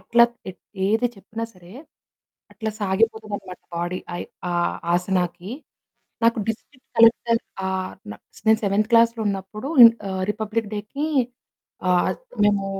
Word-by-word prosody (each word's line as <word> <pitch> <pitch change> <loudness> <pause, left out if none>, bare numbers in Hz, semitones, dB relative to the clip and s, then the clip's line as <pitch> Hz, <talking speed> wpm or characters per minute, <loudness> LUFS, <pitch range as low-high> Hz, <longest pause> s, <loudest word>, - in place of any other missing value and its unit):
ఎట్లా, 235 +5 +5 0.6
ఏది 225 +4 +2
చెప్పినా 220 +4 -6
సరే, 180 -1 -16 0.8
అట్లా 220 -1 -4
సాగిపోతదనమాట 205 -1 -1 0.2
బాడీ. 175 +2 -2 0.2
అయ్ - - -4 0.2
ఆ - - -1 0.4
ఆసనాకి. 180 +1 -1 0.7
నాకు 230 0 +4
డిస్ట్రిక్ట్ 255 +4 -7
కలెక్టర్. 230 0 +5 0.3
ఆహ్, 190 0 -2 0.2
నా - - -7 0.3
నేను 220 0 +6
సెవెంత్ 205 +2 +1
క్లాస్‌లో 230 0 +4
ఉన్నప్పుడు 200 +4 -4 0.4
ఆహ్, 190 0 -2
రిపబ్లిక్ 220 0 -3
డేకి 215 +8 -4 0.8
ఆహ్, 180 -1 +3 0.3
మేము 205 -1 +2
210 Hz, 115 wpm, -23 LUFS, 190-230 Hz, 0.8 s, నేను